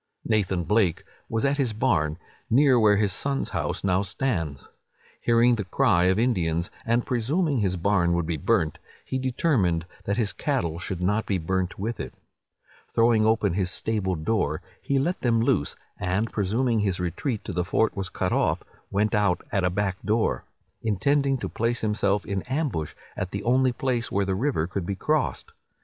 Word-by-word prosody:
Nathan 95 -5 +1
Blake 95 -1 +2 0.3
was 115 +2 0
at 140 +1 +2
his 130 -6 +1
barn, 75 -7 +1 0.3
near 130 0 +5
where 105 -2 +5
his 100 -2 +2
son's 140 -1 -1
house - - -2
now 95 -1 +2
stands. 95 - -2 0.5
Hearing 120 +1 +4
the 110 -3 -1
cry 95 -3 +2
of 95 +1 +3
Indians, 85 -8 0 0.2
and 120 +1 +2
presuming 140 +5 0
his 95 -3 0
barn 90 -1 +2
would 85 -1 0
be 85 0 -1
burnt, 90 -3 +1 0.3
he 130 - -2
determined 120 - +1 0.2
that 100 - -1
his 105 -5 +1
cattle 100 - -1
should 90 -1 -4
not 105 +5 +1
be 100 - +1
burnt 90 +2 -2
with 110 +4 -3
it. - - -6 0.8
Throwing 115 -2 +4
open 110 -4 +2
his 95 -1 0
stable 95 -1 -1
door, 80 -2 -1 0.2
he 140 - 0
let 170 +7 0
them 115 -2 +2
loose, 95 -10 +1 0.2
and 95 +5 -1
presuming 115 +4 +1
his 100 -3 0
retreat 100 - -2
to 95 - -5
the 90 +1 0
fort 105 +4 +1
was 95 -2 -3
cut - - -1
off, - - +1 0.3
went 105 +2 +1
out 105 -4 +2
at 95 - +1
a 90 - +3
back 95 0 -2
door, 110 +1 0 0.4
intending 135 +6 +1
to - - -4
place 115 +1 -1
himself 105 -2 +1
in 100 -1 -2
ambush 130 - -2 0.2
at 95 - -3
the 100 +1 -4
only 130 +2 +3
place 125 -3 -2
where 100 0 +1
the 95 - 0
river 110 - 0
could 90 0 -4
be 100 - -1
crossed. 150 +7 -1
105 Hz, 180 wpm, -25 LUFS, 90-120 Hz, 0.8 s, near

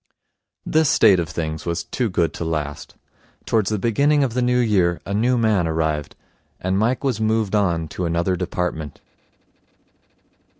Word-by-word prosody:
This 155 -2 +2
state 100 -5 +5
of 85 -2 -2
things 80 -1 -4
was 85 -1 -1
too 125 -3 -2
good 85 -3 0
to - - -5
last. 75 -3 -4 0.5
Towards 110 -3 +1
the 110 - 0
beginning 140 +8 +2
of 125 -4 -1
the 125 - 0
New 125 0 +2
Year 95 -8 +2
a 100 - -4
new 120 +5 +2
man 110 -7 +2
arrived, 80 -2 -2 0.4
and 95 +1 -1
Mike 115 +7 0
was 125 -6 -1
moved 110 -2 0
on 85 -6 +1
to 90 - -4
another 85 +2 0
department. 90 -4 -4
95 Hz, 160 wpm, -21 LUFS, 85-115 Hz, 0.5 s, state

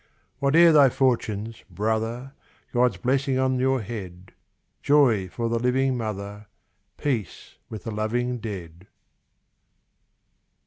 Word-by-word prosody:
Whate'er 160 +4 +5
thy 145 -3 +6
fortunes, 115 -4 -1
brother! 110 +7 -2 0.4
God's 125 0 +2
blessing 135 +1 0
on 130 -1 +1
your 130 0 +1
head; 95 -4 -8 0.5
Joy 120 -10 +3
for 115 +5 -3
the 115 0 0
living 130 +2 +1
mother, 105 -2 -5 0.5
Peace 120 - -4
with 110 -3 -8
the 115 - -5
loving 120 +4 -2
dead. 90 -5 -8
115 Hz, 105 wpm, -24 LUFS, 105-130 Hz, 0.5 s, thy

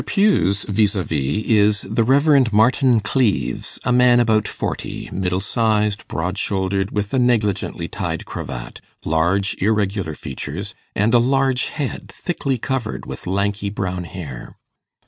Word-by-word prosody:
Pugh's 195 - +2
vis 105 0 +1
a 95 - 0
vis 75 +5 -1
is 105 -2 +3
the 110 +3 0
Rev. 135 0 +4
Martin 120 +2 +4
Cleves, 110 0 0
a 125 - 0
man 125 0 +5
about 110 -3 +2
forty - - -4
middle 90 -1 -1
sized, 105 0 0
broad 90 +4 -3
shouldered, 95 0 0
with 105 +1 -3
a 130 - +3
negligently 115 -5 0
tied - - -4
cravat, - - -7 0.2
large 85 +5 +1
irregular 100 -5 0
features, 65 - -6 0.2
and 105 +4 +2
a 120 - +7
large 135 +1 +2
head, 145 -4 -4
thickly 140 -7 -2
covered 120 -1 -3
with - - -8
lanky 100 +2 -1
brown 90 -3 -3
hair. 75 -9 -8
105 Hz, 140 wpm, -20 LUFS, 95-120 Hz, 0.2 s, a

